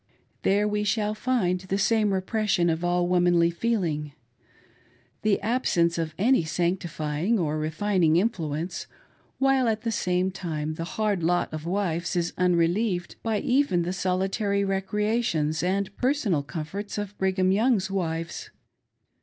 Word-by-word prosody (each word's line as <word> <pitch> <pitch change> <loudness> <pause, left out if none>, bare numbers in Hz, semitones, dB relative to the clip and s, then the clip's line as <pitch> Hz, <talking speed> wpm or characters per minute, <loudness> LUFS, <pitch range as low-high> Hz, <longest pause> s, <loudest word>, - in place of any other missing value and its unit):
There 205 +2 +2
we 210 0 0
shall 210 0 0
find 215 -5 0
the 185 +1 -3
same 215 0 +2
repression 190 -2 +1
of 160 +2 -3
all 175 0 +1
womanly 175 -1 +3
feding, 170 -8 -1 1.1
the 215 -2 +2
absence 180 -7 +1
of 160 -1 -3
any 240 0 +3
sancti 175 +3 -1
fying 155 +8 -1
or 155 -4 -1
refining 165 +1 +1
influence, 170 -4 -1 0.5
while 270 -2 +3
at 220 -1 0
the 230 - -2
same 180 -2 0
time 155 -5 -4
the 165 +1 -5
hard 210 -4 +1
lot 175 0 +1
of 155 0 -5
the - - -3
wives 175 -2 -1
is 175 -1 0
unrelieved 180 +2 +1
by 220 -2 -1
even 250 -9 +2
the 180 +2 -2
solitary 195 +2 0
recreations 195 -5 0
and 190 +3 +1
the - - -15
personal 245 - 0
comforts 170 +8 -6
of 205 -1 -4
Brigham 190 -1 +2
Young's 205 -2 +2
wives. 165 -3 -3
185 Hz, 145 wpm, -26 LUFS, 170-210 Hz, 1.1 s, womanly